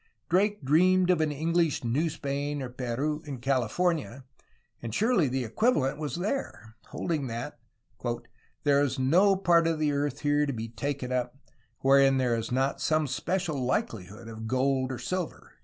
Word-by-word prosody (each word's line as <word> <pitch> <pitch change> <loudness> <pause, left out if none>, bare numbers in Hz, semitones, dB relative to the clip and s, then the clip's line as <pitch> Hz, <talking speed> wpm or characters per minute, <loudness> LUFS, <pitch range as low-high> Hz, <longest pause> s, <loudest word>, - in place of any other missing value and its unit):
Drake 200 +1 +2
dreamed 180 +5 +4
of 175 -3 +2
an 155 -1 +1
English 165 +1 0
New 140 +8 +1
Spain 145 0 -3
or 130 - -5
Peru 130 +5 -2
in 140 -4 -6
California 135 +2 0 0.3
— - - -41
and 115 -1 -5
surely 215 - +3
the 130 0 -1
equivalent 145 - +1
was 150 -2 -3
there! 175 - -4
— - - -29
holding 155 -6 -2
that 115 0 -5 1.0
"there 140 -1 +4
is 140 -1 0
no 180 +10 +4
part 170 -3 +3
of 165 -1 0
the 155 -1 +1
earth 145 -1 -2
here 145 0 +2
to 140 - -1
bee 115 -1 -5
taken 135 +1 -4
up, 125 +1 -2 0.4
wherein 135 0 +5
there 125 -2 +2
is 115 0 -4
not 135 +2 0
some 155 -1 +2
special 155 +1 -2
likelihood 110 -4 -3
of 110 0 -7
gold 130 +1 +1
or 130 - -4
silver." 180 +7 -4
140 Hz, 170 wpm, -28 LUFS, 125-165 Hz, 1.0 s, wherein